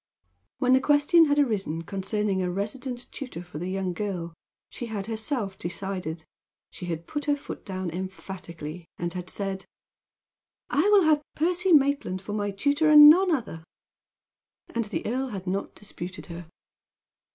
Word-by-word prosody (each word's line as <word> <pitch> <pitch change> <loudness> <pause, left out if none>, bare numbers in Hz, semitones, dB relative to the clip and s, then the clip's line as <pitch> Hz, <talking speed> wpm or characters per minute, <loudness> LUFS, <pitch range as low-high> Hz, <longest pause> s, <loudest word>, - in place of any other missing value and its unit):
When 255 0 +3
the 260 - +6
question 295 +4 +5
had 290 -1 +1
arisen 195 - 0
concerning 200 +1 -1
a 180 - 0
resident 245 +7 -4
tutor 250 - -7
for 175 -4 -9
the 180 +2 -3
young 190 -1 -2
girl, 175 -3 -4 0.4
she 240 - -6
had 205 -3 -4
herself 220 -2 -3
decided. 175 -3 -4 0.5
She 180 - -8
had 165 -1 -4
put 295 - -4
her 290 -1 +3
foot 285 - -8
down 185 -3 -4
emphatically, 180 -3 -7
and 175 0 -3
had 180 0 -6
said: 195 -1 -4 1.1
"I 320 +8 +3
will 410 -2 +6
have 310 -2 +4
Percy 360 +4 +1
Maitland 280 - +3
for 200 +2 -7
my 205 -1 -1
tutor, 285 +10 +2
and 300 0 +11
none 370 +3 +4
other." 235 - -2 1.1
And 230 -1 0
the 210 - -4
earl 260 +4 -1
had 195 -6 -6
not 195 +2 -3
disputed 185 -3 -7
her. 170 -1 -9
200 Hz, 155 wpm, -26 LUFS, 180-280 Hz, 1.1 s, and